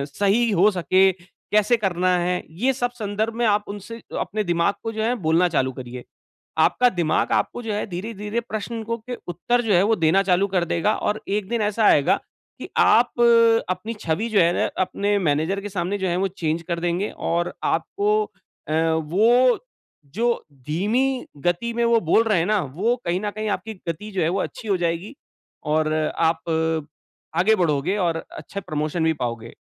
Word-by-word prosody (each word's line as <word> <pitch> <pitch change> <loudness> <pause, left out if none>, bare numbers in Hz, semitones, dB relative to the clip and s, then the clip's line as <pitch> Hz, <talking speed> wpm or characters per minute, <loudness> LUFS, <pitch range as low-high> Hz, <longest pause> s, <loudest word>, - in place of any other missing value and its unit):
सही 215 +4 +2
हो 200 +2 +5
सके, 190 +1 +3 0.4
कैसे 215 +3 +4
करना 185 -3 0
है 180 +1 -1 0.2
ये 265 +1 +3
सब 245 -1 -2
संदर्भ 220 -1 -3
में 240 0 0
आप 210 -1 +2
उनसे 210 +3 -8 0.2
अपने 215 +1 -2
दिमाग 175 +2 +1
को 225 - -3
जो 220 0 -2
है 240 +2 +1
बोलना 170 +3 +4
चालू 130 -5 0
करिए। 125 -1 -8 0.6
आपका 250 0 +4
दिमाग 170 -6 0
आपको 245 - 0
जो 220 -2 -3
है 210 - -2
धीरे-धीरे 210 +4 -4
प्रश्न 225 0 -5
को 230 +1 -3
के 245 +2 -7
उत्तर 240 +8 0
जो 215 -4 +1
है 180 +2 +5
वो 220 +2 +3
देना 170 +4 +3
चालू 190 +1 +2
कर 185 -3 0
देगा 170 +5 +1
और 210 +1 -2
एक 200 -1 -1
दिन 235 -2 0
ऐसा 210 +1 +1
आएगा, 145 - +5 0.4
कि - - -7
आप 240 +2 +5 0.6
अपनी 185 +5 -3
छवि 175 +8 -1
जो 215 - +3
है 170 +1 +4
ना - - +1 0.2
अपने 200 +2 0
मैनेजर 165 +4 0
के 205 - -6
सामने 185 +1 -2
जो 190 - -1
है 175 - 0
वो 195 - +1
चेंज 165 -3 -2
कर 170 -1 -2
देंगे 175 +4 -1 0.2
और 175 +1 0
आपको 420 +2 +1 0.5
अ, - - 0 0.2
वो 225 +11 +3 0.6
जो 235 +2 0 0.2
धीमी 240 - 0 0.2
गति 175 +7 0
में 235 0 0
वो 235 -1 +4
बोल 175 +7 +3
रहे 215 -5 +2
हैं 165 - +1
ना, 210 -3 +2
वो 190 - 0
कहीं 175 +2 0
न 210 - -1
कहीं 215 +1 -4
आपकी 210 +3 -3 0.2
गति 210 +6 -5
जो 190 - -1
है - - +2
वो 195 - -1
अच्छी 225 - -6
हो 200 - +2
जाएगी। 170 - -2 0.5
और 155 0 +1 0.2
आप, 165 0 +2 1.0
आगे 220 +5 +4
बढ़ोगे 170 +2 0
और 170 -4 0 0.2
अच्छे 200 - -6
प्रमोशन 155 0 -2
भी 160 - +3
पाओगे। 115 -5 -5
195 Hz, 190 wpm, -23 LUFS, 170-220 Hz, 1.0 s, हो